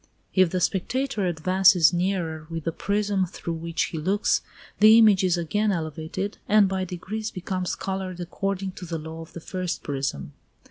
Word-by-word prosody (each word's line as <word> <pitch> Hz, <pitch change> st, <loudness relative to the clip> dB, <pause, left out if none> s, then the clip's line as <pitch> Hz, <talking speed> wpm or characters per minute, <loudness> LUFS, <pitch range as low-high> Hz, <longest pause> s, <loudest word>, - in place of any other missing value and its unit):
If 185 Hz, -2 st, +4 dB
the 185 Hz, -, -1 dB
spectator 210 Hz, +3 st, 0 dB
advances 185 Hz, 0 st, +4 dB
nearer 175 Hz, -4 st, -1 dB
with 165 Hz, -1 st, -5 dB
the 165 Hz, -, -1 dB
prism 200 Hz, +1 st, 0 dB
through 170 Hz, 0 st, -5 dB
which 165 Hz, 0 st, -2 dB
he 160 Hz, -, -4 dB
looks, 195 Hz, +6 st, +1 dB, 0.4 s
the 215 Hz, +1 st, +8 dB
image 210 Hz, -4 st, +6 dB
is 180 Hz, -2 st, +2 dB
again 205 Hz, +6 st, 0 dB
elevated, 160 Hz, +3 st, -4 dB
and 210 Hz, -1 st, +6 dB
by 190 Hz, 0 st, -2 dB
degrees 200 Hz, +5 st, -5 dB
becomes 185 Hz, 0 st, -3 dB
coloured 190 Hz, -2 st, -4 dB
according 195 Hz, +2 st, -3 dB
to 180 Hz, -, -9 dB
the 165 Hz, 0 st, -3 dB
law 160 Hz, +1 st, -7 dB
of 165 Hz, -, -12 dB
the -, -, -7 dB
first 185 Hz, 0 st, -4 dB
prism. 135 Hz, -, -3 dB
185 Hz, 170 wpm, -25 LUFS, 165-195 Hz, 0.4 s, the